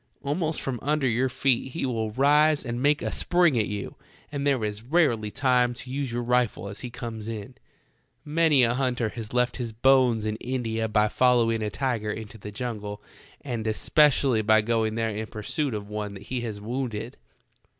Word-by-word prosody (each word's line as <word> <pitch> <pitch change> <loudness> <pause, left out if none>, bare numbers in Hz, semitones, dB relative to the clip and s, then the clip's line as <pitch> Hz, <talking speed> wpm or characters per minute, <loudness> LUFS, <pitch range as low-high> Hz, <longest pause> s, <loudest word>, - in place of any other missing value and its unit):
Almost 155 +3 -1
from 130 -3 -3
under' 150 -1 +1
your 125 +2 +1
feet 130 0 0
he 165 - -2
will 115 -4 -1
rise 150 +3 +4
and 120 0 -3
make 145 +2 +2
a - - -1
spring 175 -8 +3
at 105 - +1
you, 105 -1 -5 0.3
and 145 -1 -2
there 135 -5 +2
is 105 0 -3
rarely 120 -6 +1
time 125 0 +2
to 125 +1 -7
use 135 -2 -2
your 120 +1 -2
rifle 120 -5 +1
as 100 - -7
he 125 - -6
comes 115 -2 -6
on. 110 +2 -6 0.7
Many 150 -3 +4
a 120 0 +3
hunter 125 -3 0
has 110 -1 -7
left 125 0 +1
his 120 -3 -4
bones 125 -2 +3
in 110 0 -2
India 115 -3 -2
by 105 0 +3
following 115 -1 +3
a 105 - -1
tiger 110 +1 -2
into 110 +1 -7
the 105 +1 -8
jungle, 105 -3 -5 0.4
and 120 -5 -4
especially 130 +1 +3
by 110 0 +4
going 110 0 0
there 115 -1 0
in 110 +1 -4
pursuit 125 +5 -3
of 100 -1 -5
one 105 -1 -5
that 100 - -10
he 125 +3 -3
has 110 -3 -5
wounded. 115 0 -4
120 Hz, 190 wpm, -26 LUFS, 110-130 Hz, 0.7 s, rise